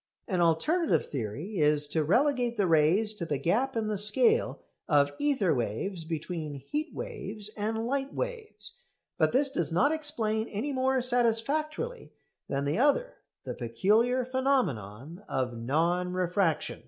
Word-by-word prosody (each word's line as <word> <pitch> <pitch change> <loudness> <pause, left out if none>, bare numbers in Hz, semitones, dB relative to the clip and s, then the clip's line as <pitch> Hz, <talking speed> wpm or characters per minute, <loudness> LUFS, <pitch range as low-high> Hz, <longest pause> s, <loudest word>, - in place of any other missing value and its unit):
An 185 -4 0
alternative 300 - +2
theory 145 - -4
is 150 0 +3
to 160 0 0
relegate 245 - +1
the 200 - +2
rays 175 +7 +3
to 210 - -6
the 150 -4 -1
gap 230 - 0
in 225 -1 0
the 210 -2 -1
scale 445 - +4 0.3
of 145 -2 +3
ether 260 - +2
waves 140 - -3
between 160 -2 -5
heatwaves 300 - -4
and 220 +2 -2
light 270 +2 -2
waves. 485 0 -6 0.4
But - - +3
this 275 +2 +2
does 275 - -1
not 260 - +3
explain 230 -8 -2
any 245 +8 -3
more 260 -1 +1
satisfactorily 275 - -1 0.4
than 140 0 -1
the 145 +8 -1
other 295 - +2 0.3
the - - -5
peculiar 215 - +1
phenomenon 175 - -1
of 125 -2 -2
non 170 +9 0
refraction. 180 -2 0
210 Hz, 140 wpm, -29 LUFS, 160-265 Hz, 0.4 s, scale